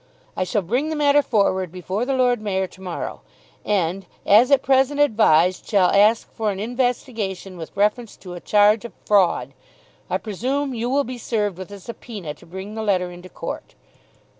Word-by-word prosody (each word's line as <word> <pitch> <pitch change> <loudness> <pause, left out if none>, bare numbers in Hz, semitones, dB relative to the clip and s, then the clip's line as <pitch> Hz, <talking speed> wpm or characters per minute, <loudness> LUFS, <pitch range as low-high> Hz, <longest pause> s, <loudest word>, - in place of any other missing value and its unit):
I 185 - -1
shall 195 +2 -1
bring 250 - -1
the 315 - -2
matter 290 -1 +4
forward 190 - +1
before 185 +5 -3
the 270 +1 0
Lord 250 -3 +2
Mayor 190 -2 -1
to 185 0 -15
morrow, 180 -3 -5 0.4
and 190 -2 -1 0.2
as 225 +6 +6
at 280 -2 +4
present 270 +2 +2
advised 185 - +4
shall 195 -4 +3
ask 210 +3 +4
for 220 -2 -1
an 195 -1 -3
investigation 225 -5 -2
with 165 +2 -9
reference 210 +3 0
to 180 -2 -10
a 175 - -7
charge 210 +3 +3
of 235 -5 -8
fraud. 175 -10 +2 0.6
I 185 - +1
presume 255 +8 -2
you 235 +1 -2
will 280 +2 +2
be 250 -1 -7
served 210 -5 -2
with 185 - -7
a 200 0 -9
subpoena 205 -6 -8
to 150 - -19
bring 190 +4 -8
the 220 - -4
letter 185 -4 0
into 175 +1 -11
court." - - -7
210 Hz, 185 wpm, -22 LUFS, 185-245 Hz, 0.6 s, as